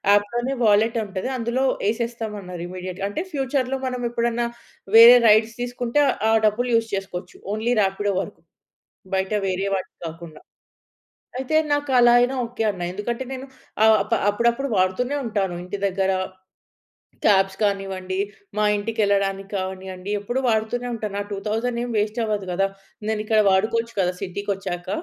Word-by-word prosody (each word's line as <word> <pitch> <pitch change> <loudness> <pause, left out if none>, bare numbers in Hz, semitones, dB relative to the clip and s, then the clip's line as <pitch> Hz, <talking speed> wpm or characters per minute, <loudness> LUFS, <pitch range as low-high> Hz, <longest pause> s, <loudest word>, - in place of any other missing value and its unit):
అప్‌లోనే 240 +6 0
wallet 220 +3 +4
ఉంటది. 195 +2 -4
అందులో 240 +2 -1 0.3
ఎసేస్తాం 230 -1 -3
అన్నారు. 180 -3 -8
ఇమ్మీడియేట్‌గా. 185 +1 -5
అంటే 205 - -3
ఫ్యూచర్‌లో 270 -2 -1
మనం 250 -1 -3
ఎప్పుడన్నా 235 0 0 0.5
వేరే 230 +2 +11
రైడ్స్ 220 +2 +4
తీసుకుంటే 245 +2 0 0.3
ఆ - - +4
డబ్బులు 230 +4 +1
యూజ్ 225 0 +1
చేసుకోవచ్చు. 185 -2 -6 0.2
ఓన్లీ 225 +3 0
రాపిడో 200 +1 0
వరకు. - - -9 0.7
బయట 190 +1 0 0.2
వేరే 190 +1 -1
వాటికి 190 -1 -6
కాకుండా. 165 -1 -9 1.0
అయితే 265 +4 -2 0.2
నాకు 290 -1 -1
అలా 240 0 +6
అయినా 245 +2 +2
ఓకె. 235 -1 -4
అన్న. 185 -3 -9
ఎందుకంటే 235 +6 -3
నేను 265 0 -6 0.4
ఆప 220 0 +4 0.2
అప్పుడప్పుడు 235 +6 +1
వాడుతూనే 190 +9 +1
ఉంటాను. 200 -5 -1
ఇంటి 180 +3 -5
దగ్గర 190 0 0 1.2
క్యాబ్స్ 195 -1 +4
కానివ్వండి, 195 -2 -1 0.4
మా 210 - +1
ఇంటికెళ్ళడానికి 200 -2 0
కానివ్వండి. 190 0 -5
ఎప్పుడూ 240 +6 -2
వాడుతూనే 225 +2 0
ఉంటాను. 215 -3 -4
ఆ - - -9
2000 225 +4 -2
ఏం 245 - -4
వేస్ట్ 210 +2 -1
అవ్వదు 210 -3 -2
కదా! 195 +2 +2 0.4
నేను 220 -1 0
ఇక్కడ 220 0 +3
వాడుకోవచ్చు 230 +4 +1
కదా! 180 -1 +1
సిటీకొచ్చాక. 195 -2 -4
210 Hz, 140 wpm, -23 LUFS, 195-235 Hz, 1.2 s, వేరే